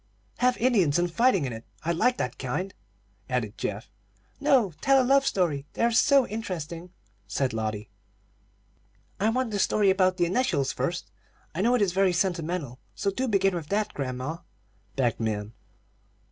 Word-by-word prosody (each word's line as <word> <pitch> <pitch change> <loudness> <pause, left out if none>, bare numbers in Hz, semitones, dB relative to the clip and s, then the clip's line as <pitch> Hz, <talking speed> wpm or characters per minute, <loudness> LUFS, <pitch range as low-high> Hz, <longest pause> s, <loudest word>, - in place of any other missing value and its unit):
"Have 250 0 +3
Indians 200 - +3
and 175 -1 0
fighting 230 - +3
in 125 - -3
it. 115 +1 -8 0.2
I 170 - +1
like 245 +9 +2
that 125 - -3
kind," 180 +10 -3 0.6
added 120 -5 -2
Geoff. 105 +2 -5 0.5
"No; 265 - +3
tell 270 0 +5
a 255 - +3
love 275 +1 +4
story. 150 -7 0
They - - -1
are 235 - +4
so 275 +3 +5
interesting," 180 -6 -5 0.4
said 130 +5 -1
Lotty. 110 -1 -3 1.3
"I 210 +3 +2
want 250 0 0
the 205 - -1
story 200 0 +3
about 185 -1 +2
the 175 - +3
initials 170 - +1
first. 170 - -3 0.4
I 170 - -2
know 240 +4 +3
it 230 - +3
is 185 -3 0
very 190 -1 +3
sentimental. 170 -7 -2 0.2
So 200 - -1
do 260 +6 -2
begin 195 -3 +2
with 165 -4 -4
that, 210 +3 -1
grandma," 130 +3 -4 0.6
begged 125 -4 0
Min. 110 -1 -2
180 Hz, 165 wpm, -27 LUFS, 140-220 Hz, 1.3 s, tell